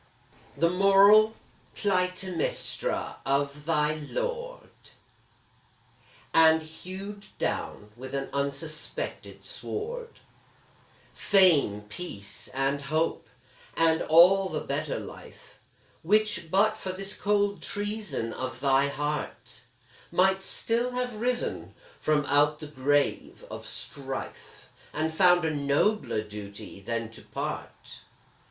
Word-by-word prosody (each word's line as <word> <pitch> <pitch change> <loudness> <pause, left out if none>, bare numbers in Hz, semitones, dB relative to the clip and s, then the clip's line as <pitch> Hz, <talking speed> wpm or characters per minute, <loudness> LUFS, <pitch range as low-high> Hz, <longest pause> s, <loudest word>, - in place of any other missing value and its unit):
The 170 +1 +3
moral 200 +3 +6 0.4
Clytemnestra 185 -2 -1
of 140 +1 -1
thy 150 -2 +2
lord, 485 - -4 1.6
And 160 0 +6
hewed 190 +6 -9
down, 105 0 -3
with 130 +3 -7
an 135 0 -3
unsuspected 150 - -4
sword, 470 -1 -5 0.9
Fame, 160 - +4
peace, 105 - -7
and 135 +1 -1
hope 155 +4 -1 0.5
and 165 0 +4
all 185 +4 +6
the 155 - -3
better 145 +2 -2
life - - -12 0.4
Which, 210 -2 +1
but 205 +5 +3
for 185 - -5
this 195 +2 -5
cold 205 -1 +1
treason 205 - -3
of 130 0 -5
thy 135 0 +3
heart, 150 +1 -4 0.5
Might 190 +1 +3
still 235 +5 -1
have 250 -3 -3
risen 245 0 -1 0.2
from 150 -1 +1
out 145 +1 +3
the 150 - -8
grave 145 0 0
of - - -7
strife, 135 -1 -7 0.3
And 160 +1 -1
found 175 0 +5
a 160 - +1
nobler 145 - +1
duty 105 -1 -9
than 115 +1 -3
to - - -12
part. - - -6
160 Hz, 105 wpm, -28 LUFS, 140-200 Hz, 1.6 s, moral